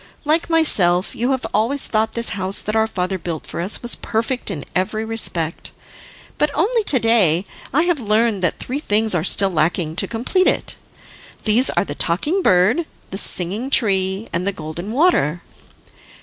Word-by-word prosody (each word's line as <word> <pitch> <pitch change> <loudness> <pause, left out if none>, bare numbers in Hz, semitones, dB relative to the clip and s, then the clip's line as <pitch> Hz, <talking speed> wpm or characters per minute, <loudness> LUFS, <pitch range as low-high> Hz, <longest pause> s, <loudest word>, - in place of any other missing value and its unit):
Like 315 +3 +1
myself, 190 - +2
you 240 +3 -1
have 260 -1 -1
always 235 +7 +1
thought 220 0 0
this 235 -1 +1
house 195 -1 -3
that 215 - -3
our 220 0 +2
father 185 -2 -3
built 165 -2 -5
for - - -5
us 190 +7 -1
was 240 - +1
perfect 230 +3 -2
in 145 - -5
every 215 +4 -1
respect, 175 -8 -1 0.7
but 300 - +2
only 440 +8 +1
to 280 - +4
day 210 -7 +2 0.3
I 300 +5 +2
have 350 -4 0
learned 215 -2 +1
that 180 - 0
three 265 +3 -4
things 220 -5 +1
are 170 -3 0
still 195 +1 +4
lacking 160 0 0
to - - +1
complete 255 +12 0
it. - - -1 0.7
These 235 +4 +3
are - - 0
the - - -5
Talking 295 - 0
Bird, 215 - +2 0.2
the 190 - -4
Singing 200 +10 +1
Tree, 195 -4 +1
and 175 +3 -1
the - - +2
Golden 170 +3 -7
Water." 230 - +1
215 Hz, 175 wpm, -19 LUFS, 180-250 Hz, 0.7 s, to